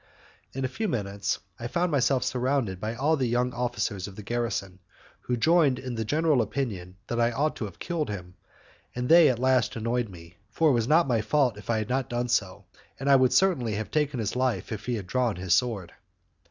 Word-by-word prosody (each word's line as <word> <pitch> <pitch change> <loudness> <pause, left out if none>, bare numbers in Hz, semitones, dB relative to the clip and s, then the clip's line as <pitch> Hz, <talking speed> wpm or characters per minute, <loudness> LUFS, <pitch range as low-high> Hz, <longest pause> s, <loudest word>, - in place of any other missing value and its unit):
In 135 0 -2
a - - +1
few 215 - -3
minutes, 100 - -2 0.2
I 120 - -4
found 175 +6 0
myself 135 -2 +2
surrounded 125 -7 -1
by 110 +3 -3
all 150 +6 +2
the 130 -4 0
young 125 +1 0
officers 120 -5 -2
of 100 - -11
the 105 - -9
garrison, 100 -4 -3 0.4
who 125 - -2
joined 155 0 +4
in 130 -1 -5
the 115 -1 -2
general 150 +2 +2
opinion 100 -7 -4
that 120 +1 -1
I 115 - +4
ought 145 +6 0
to 110 - -3
have 100 - -9
killed 165 -6 -3
him, 90 -3 -6 0.6
and 125 0 -2
they 165 -1 +8
at 125 - 0
last 130 0 +2
annoyed 115 0 -1
me, 85 -1 -13
for 160 -2 +3
it - - +3
was 115 -2 +1
not 160 +2 +4
my 115 -4 +1
fault 130 -2 +2
if 105 +2 -13
I 115 - +2
had 110 -1 -3
not 130 0 -1
done 120 0 -2
so, 100 -3 -1 0.3
and 140 +1 +1
I - - +8
would 130 -2 +4
certainly 130 - +2
have 110 +1 -4
taken 150 -4 0
his 110 0 -2
life 130 -2 -1
if 110 +1 -6
he 125 - 0
had 105 -4 -5
drawn 125 +1 0
his 90 0 0
sword. 100 -3 0
120 Hz, 220 wpm, -27 LUFS, 105-135 Hz, 0.6 s, they